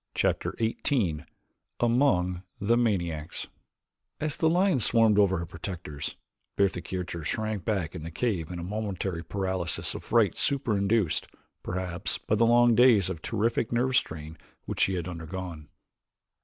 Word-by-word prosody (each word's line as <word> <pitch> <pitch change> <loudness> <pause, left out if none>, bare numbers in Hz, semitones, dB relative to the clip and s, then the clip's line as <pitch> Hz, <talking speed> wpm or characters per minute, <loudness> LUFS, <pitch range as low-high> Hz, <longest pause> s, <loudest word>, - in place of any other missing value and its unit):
Chapter - - 0
XVIII 110 - 0 0.6
Among 110 -8 +2 0.2
the 110 +4 +2
Maniacs 85 -9 -1 0.7
As 150 -1 -1
the 160 - +2
lions 175 - +3
swarmed 110 -2 +4
over 95 -2 +4
her 85 - -3
protectors, 85 -4 -6 0.4
Bertha 95 -3 +1
Kircher 85 -2 -4
shrank 110 -1 -2
back 95 -7 -1
in - - -6
the 80 - -6
cave 85 -3 -1
in 90 - -5
a 85 - -5
momentary 95 -3 -3
paralysis 95 -2 -1
of - - -7
fright 110 -6 +3
super 135 -6 +1
induced, 100 -3 +1 0.3
perhaps, 90 0 -2
by - - -3
the 115 +2 +4
long 120 0 +5
days 110 -6 +5
of 85 -4 -6
terrific 115 +2 0
nerve 125 +2 +1
strain 80 -6 -2 0.3
which - - -4
she 95 - +3
had 85 -1 -3
undergone. 85 -2 -6
95 Hz, 145 wpm, -28 LUFS, 85-115 Hz, 0.7 s, long